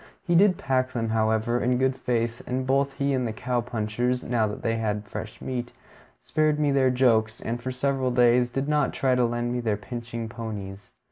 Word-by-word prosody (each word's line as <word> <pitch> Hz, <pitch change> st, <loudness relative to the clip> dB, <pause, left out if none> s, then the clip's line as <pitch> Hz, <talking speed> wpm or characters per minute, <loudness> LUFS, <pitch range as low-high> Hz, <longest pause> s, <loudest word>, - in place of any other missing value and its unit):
He 175 Hz, -, 0 dB
did 185 Hz, +2 st, +5 dB
pack 130 Hz, -1 st, 0 dB
them, 115 Hz, -2 st, -1 dB
however, 110 Hz, +2 st, +1 dB
in 125 Hz, 0 st, +2 dB
good 130 Hz, 0 st, +1 dB
faith; 120 Hz, -2 st, -1 dB
and 130 Hz, +1 st, -1 dB
both 135 Hz, +1 st, +1 dB
he 140 Hz, 0 st, 0 dB
and 130 Hz, -2 st, 0 dB
the -, -, -2 dB
cow 125 Hz, +2 st, -1 dB
punchers, 120 Hz, +2 st, -1 dB
now 115 Hz, -2 st, +1 dB
that 105 Hz, -, -6 dB
they 115 Hz, -1 st, 0 dB
had 105 Hz, -2 st, -2 dB
fresh -, -, -7 dB
meat, 125 Hz, -2 st, -4 dB, 0.5 s
spared 155 Hz, -, +1 dB
me 145 Hz, -1 st, +2 dB
their 135 Hz, -1 st, +3 dB
jokes, 115 Hz, -4 st, +2 dB
and 120 Hz, +1 st, -4 dB
for 130 Hz, +1 st, -3 dB
several 130 Hz, 0 st, 0 dB
days 120 Hz, 0 st, +4 dB
did 135 Hz, +3 st, -2 dB
not 150 Hz, 0 st, +1 dB
try 130 Hz, -1 st, +1 dB
to 125 Hz, -1 st, +3 dB
lend 120 Hz, +1 st, -1 dB
me 125 Hz, -, -1 dB
their 110 Hz, -4 st, 0 dB
pitching 115 Hz, +1 st, -6 dB
ponies. 105 Hz, -4 st, -7 dB
120 Hz, 205 wpm, -26 LUFS, 115-130 Hz, 0.5 s, did